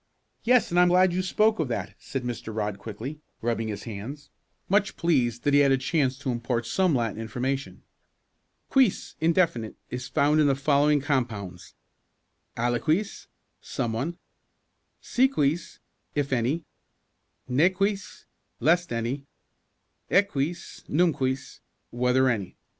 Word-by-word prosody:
"Yes, 250 -4 +3
and 175 - +3
I - - +8
am 180 - +5
glad 180 0 +4
you 185 - +1
spoke 215 +3 +2
of 155 - +1
that," 100 -5 -3
said 135 -2 -5
Mr. 120 -2 -5
Rodd 105 -2 -3
quickly, 115 +9 -7 0.2
rubbing 115 -1 -1
his 105 -2 -5
hands, 120 +7 -7 0.4
much 200 +2 +1
pleased 125 -9 +1
that 145 - +2
he 145 - +6
had 140 -1 +5
a 135 - +4
chance 135 -1 0
to 140 -2 -2
impart 120 0 -2
some 185 +2 +2
Latin 115 -2 -1
information. 130 +5 -3 0.9
"Quis 260 -8 +2
indefinite 160 - +1 0.2
is 125 +1 -4
found 150 +2 +3
in 150 - +4
the 135 - +3
following 145 +1 +3
compounds: 115 - -3 0.8
aliquis 140 - 0 0.3
someone; 125 +9 -3 0.8
si 260 +2 +3
quis, 165 - -1 0.4
if 140 -2 0
any; 130 +7 0 0.8
ne 140 +8 +4
quis, 195 +1 -2 0.3
lest 175 0 +2
any; 120 +5 -3 0.8
ecquis, 175 -4 0
num 170 +2 +3
quis, 130 -1 -3 0.3
whether 125 +2 +2
any. 100 -7 -2
140 Hz, 135 wpm, -26 LUFS, 120-170 Hz, 0.9 s, I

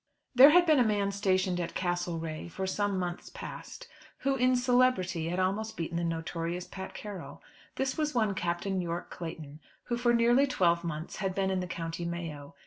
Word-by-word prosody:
There 265 +3 +10
had 350 +3 +6
been 310 -4 +5
a - - +6
man 205 -3 +1
stationed 185 -2 +1
at 170 - -4
Castlerea 170 -3 -2
for 190 +3 -4
some 200 +1 0
months 175 -1 -4
past, - - -9 0.3
who 275 0 +1
in 255 0 +3
celebrity 245 -10 +2
had 180 - -2
almost 215 +4 -1
beaten 170 0 -3
the 170 - -1
notorious 165 +1 -3
Pat 190 -1 -8
Carroll. 205 -3 -8 0.3
This 265 +2 -1
was 300 -3 0
one 215 -4 +2
Captain 185 +1 -1
Yorke 170 0 -4
Clayton, 160 -3 -7 0.2
who 240 - -2
for 240 0 +3
nearly 240 +4 +4
twelve 170 -8 +2
months 160 -1 -5
had 190 -2 -2
been 190 -1 +1
in 190 - 0
the 180 - -3
County 165 0 -4
Mayo. 165 -4 -5
185 Hz, 185 wpm, -30 LUFS, 170-230 Hz, 0.3 s, There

